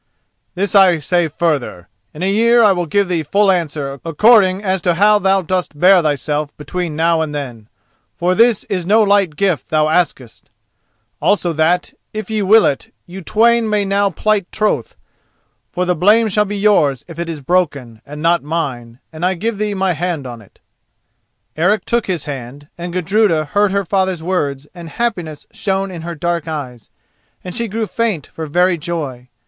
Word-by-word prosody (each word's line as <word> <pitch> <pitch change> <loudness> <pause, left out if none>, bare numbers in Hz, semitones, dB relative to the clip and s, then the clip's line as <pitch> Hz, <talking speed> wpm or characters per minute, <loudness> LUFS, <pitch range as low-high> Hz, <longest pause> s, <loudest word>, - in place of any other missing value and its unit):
"This 195 +2 -2
I 190 -4 +6
say 175 +3 0
further: 145 - -2 0.2
in 155 - -7
a 190 - +1
year 235 +3 +4
I 210 - +6
will 175 -2 -1
give 200 +5 +1
thee 175 -2 -1
full 195 +6 +2
answer 145 -6 -3
according 190 +3 +4
as 190 -2 -1
to 175 -1 +1
how 210 +3 +4
thou 195 -1 +2
dost 180 -4 -2
bear 185 +1 +6
thyself 150 -1 -2
between 160 +2 -4
now 165 +1 +2
and 150 -2 -3
then, 120 -6 -7 0.5
for 180 +1 +1
this 230 +1 +3
is 185 -2 -3
no 215 +2 +4
light 200 -6 +2
gift 180 -6 -1
thou 155 0 +2
askest; 155 -8 -2 0.7
also 180 -4 +1
that, 160 +3 +1 0.2
if 215 -1 -6
ye 215 -1 0
will 215 +3 +5
it, 135 - -2
you 185 +2 -9
twain 230 +5 +2
may 210 -1 +1
now 200 +1 +1
plight 200 +1 -1
troth, 215 -1 -1 0.8
for 180 0 -1
the 180 - +1
blame 210 +7 +3
shall 210 +1 +1
be 205 +1 -4
yours 180 -10 +2
if 165 -1 -10
it 170 0 -3
is 160 -2 -5
broken, 140 -8 -1
and 150 +2 -9
not 170 0 +3
mine, 135 -7 -4 0.2
and 160 +1 -8
I 185 +1 +1
give 215 +4 -3
thee 210 -1 -1
my 190 -1 0
hand 165 -3 -3
on 120 -2 -8
it." 100 - -21 1.0
Eric 185 +6 +1
took 235 -1 -1
his 180 -6 -2
hand, 140 +1 -8
and 175 0 -6
Gudruda 180 -2 +1
heard 205 +6 +1
her 200 0 -1
father's 190 -2 -1
words 145 -6 -2
and 170 -2 -10
happiness 175 -8 -3
shone 195 -1 -2
in 170 -3 -7
her 170 +1 -6
dark 170 0 -2
eyes, 130 -7 -6 0.5
and 180 - -7
she 235 -1 -2
grew 220 +2 -2
faint 215 - -2
for 160 -1 -8
very 175 +3 +2
joy. 145 -7 -5
175 Hz, 185 wpm, -17 LUFS, 155-200 Hz, 1.0 s, I